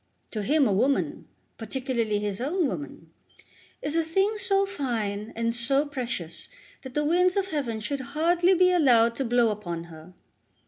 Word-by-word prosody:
To 215 - -3
him 285 +7 +3
a 200 - +1
woman, 255 +8 0 0.3
particularly 235 -2 -1
his 205 0 -3
own 330 +6 0
woman, 160 - -7 0.7
is 295 +2 -2
a 330 - +2
thing 390 +6 0
so 395 0 +2
fine 225 - -3
and 230 0 0
so 270 +5 +2
precious 245 - -5 0.3
that 260 -1 -10
the 295 0 +1
winds 360 +4 +3
of 390 -1 0
heaven 265 -9 -2
should 275 +6 -3 0.2
hardly 350 +3 +3
be 365 +1 +4
allowed 240 -9 +4
to 270 - -1
blow 240 -1 +3
upon 175 -5 -5
her. 170 +1 -13
260 Hz, 165 wpm, -26 LUFS, 215-325 Hz, 0.7 s, be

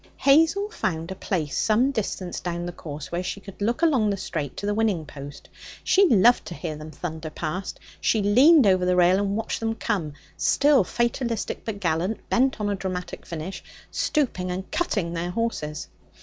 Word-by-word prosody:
Hazel 325 +8 +4
found 165 - -3
a - - -4
place 165 -7 -2
some 235 +5 +3
distance 195 -7 -3
down 175 -1 -3
the 175 - -4
course 150 -4 -8
where 175 +1 -1
she 185 +2 -4
could 200 0 -12
look 235 +10 0
along 260 -10 +3
the 200 - -1
straight 155 -7 -4
to - - -4
the 205 - +1
winning 205 -7 0
post; 145 -1 -10 0.4
she 390 0 +5
loved 235 +2 +5
to 170 - -6
hear 160 -3 -4
them 155 +1 -9
thunder 160 -1 -6
past. 170 +5 -4 0.2
She 220 -2 +1
leaned 270 +8 +6
over 185 -2 +4
the 180 0 +2
rail 180 +1 +5
and 200 0 0
watched 225 - -2
them 225 0 -1
come, 185 -11 -2 0.2
still 285 -5 +4
fatalistic, 235 +2 -2
but 220 -3 -4
gallant, 180 +3 -1
bent 260 0 +2
on 210 - -1
a 205 - 0
dramatic 185 -2 -5
finish, 170 +3 -6 0.3
stooping 240 - 0
and 185 +1 -5
'cutting' 205 - -1
their 170 +1 -2
horses. 180 -8 -3
195 Hz, 185 wpm, -25 LUFS, 170-230 Hz, 0.4 s, leaned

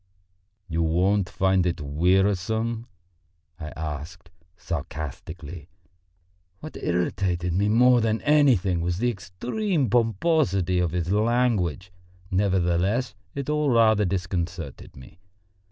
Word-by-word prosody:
"You 85 -1 -1
won't 90 +4 +1
find 95 -2 +2
it 85 -1 -1
wearisome?" 95 - 0 0.7
I 75 - -6
asked 80 +3 -6 0.3
sarcastically. 80 0 -6 0.9
What 155 - -9
irritated 90 0 -1
me 100 +4 +1
more 125 +2 +5
than 110 0 0
anything 125 - +3
was 85 +1 -1
the 120 +4 +1
extreme 125 - -2
pomposity 110 - +2
of 90 -1 +1
his 90 +1 -2
language. 105 - +1 0.4
Nevertheless, 95 +4 +1 0.2
it 140 -1 -4
all 150 -1 +1
rather 110 -3 +4
disconcerted 90 -5 -4
me. 65 +5 -14
95 Hz, 105 wpm, -25 LUFS, 85-115 Hz, 0.9 s, more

